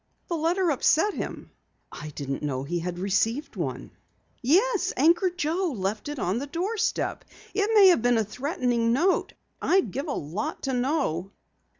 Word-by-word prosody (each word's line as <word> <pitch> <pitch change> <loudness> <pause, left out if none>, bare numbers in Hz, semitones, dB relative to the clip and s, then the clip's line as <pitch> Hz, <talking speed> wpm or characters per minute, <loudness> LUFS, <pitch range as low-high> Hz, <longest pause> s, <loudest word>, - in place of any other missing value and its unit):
"The 340 - 0
letter 335 +2 +1
upset 320 +8 +3
him?" - - -6 0.4
"I 150 - -7
didn't 140 -1 -4
know 135 -3 -2
he 170 +5 -2
had 175 +1 -4
received 220 +9 0
one." - - -4 0.5
"Yes, 375 - +2
Anchor 335 +6 +4
Joe 350 0 -1
left 200 +7 -3
it 295 - -5
on 195 -1 -1
the 280 - -5
doorstep. 370 +9 -1 0.3
It 415 0 +1
may 395 -3 +9
have 345 - +4
been 245 0 +3
a 220 - +2
threatening 240 - 0
note. 345 +9 +1 0.3
I'd 380 +1 +2
give 275 +4 -4
a 285 - -1
lot 170 - -4
to 270 - -1
know." 250 - 0
275 Hz, 165 wpm, -26 LUFS, 205-345 Hz, 0.5 s, may